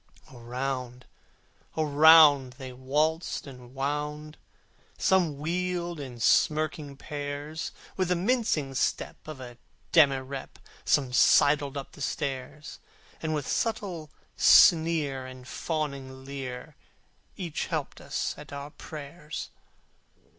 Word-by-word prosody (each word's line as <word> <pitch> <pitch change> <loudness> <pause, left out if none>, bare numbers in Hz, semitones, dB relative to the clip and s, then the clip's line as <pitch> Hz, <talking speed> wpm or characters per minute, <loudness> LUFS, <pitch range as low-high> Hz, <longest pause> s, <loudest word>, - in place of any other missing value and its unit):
Around, 125 +1 -4 0.7
around, 150 -3 +6
they 130 0 -9
waltzed 150 +6 -1
and 125 -2 -12
wound; 150 +2 -3 0.6
Some 175 -7 +2
wheeled 175 +2 -2
in 130 -4 -8
smirking 150 +3 +1
pairs; 145 +2 -5 0.3
With 185 -1 +1
the 180 - +2
mincing 180 - 0
step 130 - -1
of 155 -3 -7
a 120 -2 -10 0.4
demirep 135 -3 +2 0.3
Some 135 -4 +2
sidled 145 +2 +4
up 140 - -6
the - - -13
stairs: 140 0 -4 0.4
And 155 -1 -1
with 145 -2 -3
subtle 190 -9 -2 0.3
sneer, 160 -6 +5
and 130 0 -11
fawning 140 -5 -4
leer, 135 -2 -7 0.6
Each 170 -5 -3
helped - - -4
us - - -2
at 150 - -11
our 140 +1 -7
prayers. 150 +1 -8
145 Hz, 105 wpm, -28 LUFS, 135-160 Hz, 0.7 s, around